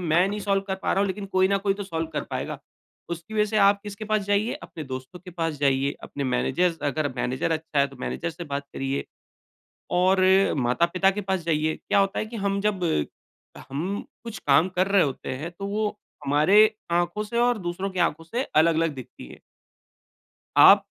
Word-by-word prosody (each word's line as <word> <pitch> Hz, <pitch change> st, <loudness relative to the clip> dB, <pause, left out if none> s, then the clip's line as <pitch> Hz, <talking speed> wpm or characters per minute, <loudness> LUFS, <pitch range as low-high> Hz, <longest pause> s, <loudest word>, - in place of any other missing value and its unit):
मैं 175 Hz, +1 st, +3 dB
नहीं 210 Hz, +1 st, -3 dB
सॉल्व 195 Hz, -1 st, +1 dB
कर 190 Hz, -, 0 dB
पा -, -, +1 dB
रहा 195 Hz, -, +1 dB
हूँ, 200 Hz, -, +2 dB
लेकिन 195 Hz, +1 st, -4 dB
कोई 190 Hz, -1 st, +2 dB
न 200 Hz, 0 st, +2 dB
कोई 195 Hz, -, +3 dB
तो 205 Hz, -, -5 dB
सॉल्व 165 Hz, -3 st, -3 dB
कर -, -, -2 dB
पाएगा। -, -, -4 dB, 0.5 s
उसकी 170 Hz, +6 st, -6 dB
वजह 210 Hz, -, +3 dB
से 215 Hz, +1 st, -2 dB
आप 200 Hz, 0 st, +4 dB
किसके 205 Hz, 0 st, -7 dB
पास 215 Hz, -1 st, 0 dB
जाइए, 205 Hz, +3 st, +1 dB
अपने 155 Hz, -, -8 dB
दोस्तों 130 Hz, +5 st, -7 dB
के 180 Hz, -, -9 dB
पास 165 Hz, -2 st, -2 dB
जाइए। 140 Hz, 0 st, +2 dB
अपने 140 Hz, -, -5 dB
मैनेजर 165 Hz, +7 st, +1 dB
अगर 145 Hz, +1 st, 0 dB
मैनेजर 130 Hz, +5 st, -1 dB
अच्छा 160 Hz, -2 st, -2 dB
है, 140 Hz, -, +4 dB
तो 135 Hz, -1 st, -14 dB
मैनेजर 170 Hz, -, -3 dB
से 170 Hz, +2 st, -8 dB
बात 140 Hz, -2 st, -4 dB
करिए, 135 Hz, +1 st, -2 dB, 0.9 s
और 185 Hz, +1 st, +3 dB, 0.5 s
माता-पिता 175 Hz, +8 st, +2 dB
के 210 Hz, +1 st, -4 dB
पास 190 Hz, -, +1 dB
जाइए। 155 Hz, -1 st, +1 dB
क्या 205 Hz, -1 st, 0 dB
होता 195 Hz, 0 st, +1 dB
है -, -, -2 dB
कि 230 Hz, +2 st, -9 dB
हम 200 Hz, 0 st, +1 dB
जब 200 Hz, -4 st, 0 dB, 0.9 s
हम 175 Hz, +9 st, -3 dB, 0.2 s
कुछ 225 Hz, -3 st, -7 dB
काम 145 Hz, +5 st, +5 dB
कर 185 Hz, +1 st, +1 dB
रहे 195 Hz, -2 st, +4 dB
होते 135 Hz, -3 st, -4 dB
हैं, 155 Hz, +6 st, -6 dB
तो 185 Hz, +3 st, -7 dB
वो 210 Hz, +1 st, 0 dB, 0.4 s
हमारे 195 Hz, +10 st, +5 dB, 0.2 s
आँखों 175 Hz, +4 st, 0 dB
से 235 Hz, +3 st, -4 dB
और 245 Hz, 0 st, +3 dB
दूसरों 180 Hz, +2 st, -3 dB
की 185 Hz, -, -4 dB
आँखों 165 Hz, -1 st, +1 dB
से 235 Hz, +10 st, -2 dB
अलग-अलग 165 Hz, -, +2 dB
दिखती 130 Hz, -2 st, -10 dB
है। -, -, -13 dB, 1.2 s
आप -, -, +8 dB
180 Hz, 200 wpm, -25 LUFS, 155-200 Hz, 1.2 s, आप